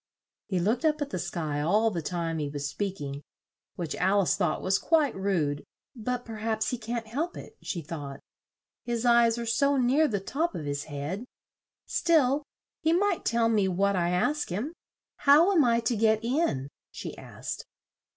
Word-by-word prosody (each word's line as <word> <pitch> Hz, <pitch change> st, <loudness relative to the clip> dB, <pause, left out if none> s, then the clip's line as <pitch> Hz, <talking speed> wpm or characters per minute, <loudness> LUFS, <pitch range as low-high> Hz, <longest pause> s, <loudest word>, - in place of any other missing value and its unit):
He 185 Hz, -3 st, 0 dB
looked 220 Hz, +8 st, +1 dB
up 310 Hz, -1 st, +2 dB
at 285 Hz, -, -9 dB
the 185 Hz, -, -2 dB
sky 160 Hz, -4 st, -2 dB
all 210 Hz, +8 st, +3 dB
the 170 Hz, -4 st, -2 dB
time 165 Hz, 0 st, -2 dB
he 145 Hz, -1 st, -2 dB
was 145 Hz, 0 st, -3 dB
speak 195 Hz, +5 st, -3 dB
ing, 140 Hz, -1 st, -5 dB, 0.5 s
which 170 Hz, -4 st, -3 dB
Al 200 Hz, +1 st, +3 dB
ice -, -, +2 dB
thought 185 Hz, -3 st, 0 dB
was 190 Hz, +1 st, +2 dB
quite 310 Hz, -6 st, +3 dB
rude. 175 Hz, -7 st, 0 dB, 0.3 s
"But 245 Hz, +2 st, -3 dB
per 225 Hz, -2 st, -7 dB
haps 220 Hz, 0 st, -1 dB
he 250 Hz, -, -3 dB
can't 230 Hz, 0 st, -3 dB
help 295 Hz, +11 st, -3 dB
it," -, -, -10 dB
she 170 Hz, -5 st, -4 dB
thought, 145 Hz, -3 st, -6 dB, 0.6 s
"his 235 Hz, 0 st, -2 dB
eyes 235 Hz, -1 st, +5 dB
are 235 Hz, -, -3 dB
so 280 Hz, +4 st, +2 dB
near 265 Hz, +5 st, +4 dB
the 205 Hz, -7 st, -1 dB
top 310 Hz, -, -2 dB
of 155 Hz, -, -4 dB
his 145 Hz, 0 st, -3 dB
head. 155 Hz, -, -4 dB, 0.6 s
Still 300 Hz, -5 st, +3 dB, 0.4 s
he 320 Hz, 0 st, +3 dB
might 390 Hz, +1 st, +2 dB
tell 230 Hz, 0 st, +3 dB
me 210 Hz, -4 st, +3 dB
what 195 Hz, +2 st, +1 dB
I 175 Hz, -1 st, +1 dB
ask 290 Hz, +13 st, +1 dB
him 220 Hz, -, -3 dB, 0.4 s
How 305 Hz, +7 st, +6 dB
am 340 Hz, -6 st, +5 dB
I 235 Hz, -2 st, +3 dB
to 230 Hz, +1 st, 0 dB
get 220 Hz, 0 st, +3 dB
in?" 240 Hz, -, 0 dB, 0.2 s
she -, -, -7 dB
asked. -, -, -7 dB
220 Hz, 185 wpm, -28 LUFS, 175-255 Hz, 0.6 s, How